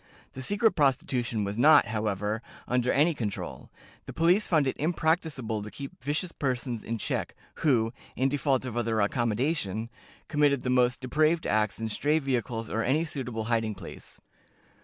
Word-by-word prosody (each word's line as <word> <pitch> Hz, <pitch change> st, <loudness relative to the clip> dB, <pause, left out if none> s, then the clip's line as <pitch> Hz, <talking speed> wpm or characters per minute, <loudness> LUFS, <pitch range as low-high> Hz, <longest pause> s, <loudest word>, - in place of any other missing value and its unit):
The 130 Hz, -, -6 dB
secret 205 Hz, -, +2 dB
prostitution 125 Hz, -6 st, +1 dB
was 100 Hz, +3 st, -3 dB
not, 150 Hz, +2 st, +7 dB
however, 105 Hz, 0 st, -1 dB, 0.3 s
under 125 Hz, 0 st, +1 dB
any 155 Hz, +4 st, +3 dB
control. 110 Hz, -8 st, -5 dB, 0.4 s
The -, -, -6 dB
police 175 Hz, +6 st, +3 dB
found 155 Hz, -5 st, +3 dB
it 130 Hz, -, -1 dB
impracticable 155 Hz, -, 0 dB
to 105 Hz, -, -7 dB
keep 140 Hz, +1 st, -9 dB
vicious 150 Hz, +5 st, -1 dB
persons 125 Hz, -5 st, -2 dB
in 115 Hz, +1 st, -3 dB
check, -, -, -3 dB, 0.2 s
who 120 Hz, -6 st, +2 dB, 0.2 s
(in 130 Hz, -, +2 dB
default 135 Hz, -1 st, 0 dB
of 120 Hz, -3 st, -5 dB
other 115 Hz, -2 st, 0 dB
accommodation) 115 Hz, -, 0 dB, 0.4 s
committed 145 Hz, -3 st, +2 dB
the 125 Hz, -, 0 dB
most 125 Hz, 0 st, +2 dB
depraved 155 Hz, +6 st, +2 dB
acts 105 Hz, -1 st, +1 dB
in 115 Hz, -, -2 dB
stray 145 Hz, +8 st, +1 dB
vehicles 125 Hz, -5 st, -2 dB
or 110 Hz, -, -1 dB
any 145 Hz, +8 st, +1 dB
suitable 125 Hz, -7 st, -4 dB
hiding 110 Hz, -2 st, 0 dB
place." -, -, -10 dB
125 Hz, 160 wpm, -28 LUFS, 110-150 Hz, 0.4 s, not